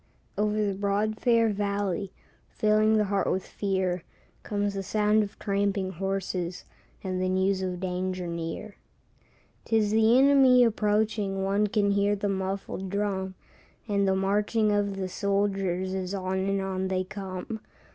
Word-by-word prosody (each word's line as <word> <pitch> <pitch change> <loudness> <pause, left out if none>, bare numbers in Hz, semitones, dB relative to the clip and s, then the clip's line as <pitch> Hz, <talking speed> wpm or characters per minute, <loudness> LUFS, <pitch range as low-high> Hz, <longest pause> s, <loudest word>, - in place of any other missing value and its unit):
= - - -39
Over 210 0 +1
the 200 - 0
broad, 205 +2 -1
fair 230 -2 +3
valley, 200 -1 -1 0.4
Filling 215 +1 +3
the 210 - +3
heart 200 -1 0
with 190 - -1
fear, 190 -3 -1 0.4
Comes 205 -1 -2
the 195 - -3
sound 210 +2 +2
of 205 -1 -5
tramping 200 -2 -1
horses, 185 -1 -3 0.4
And 185 -1 -2
the 185 - +1
news 190 +1 +1
of 180 -1 -3
danger 185 0 -2
near. 170 +5 -5 0.9
'Tis 220 -2 +2
the 220 +2 +5
enemy 265 -2 +6
approaching, 210 -3 +1
One 200 +2 +2
can 205 -1 +1
hear 200 +1 +2
the 205 0 -2
muffled 190 0 -3
drum, 190 -1 -2 0.5
And 200 -2 +1
the 190 - +3
marching 210 +3 +1
of 205 -1 0
the 190 -1 -2
soldiers, 195 -1 -1
As 190 0 -3
on 190 0 -2
and 195 0 +1
on 190 -1 -2
they 185 0 0
come. 195 +2 -6
200 Hz, 150 wpm, -27 LUFS, 190-210 Hz, 0.9 s, enemy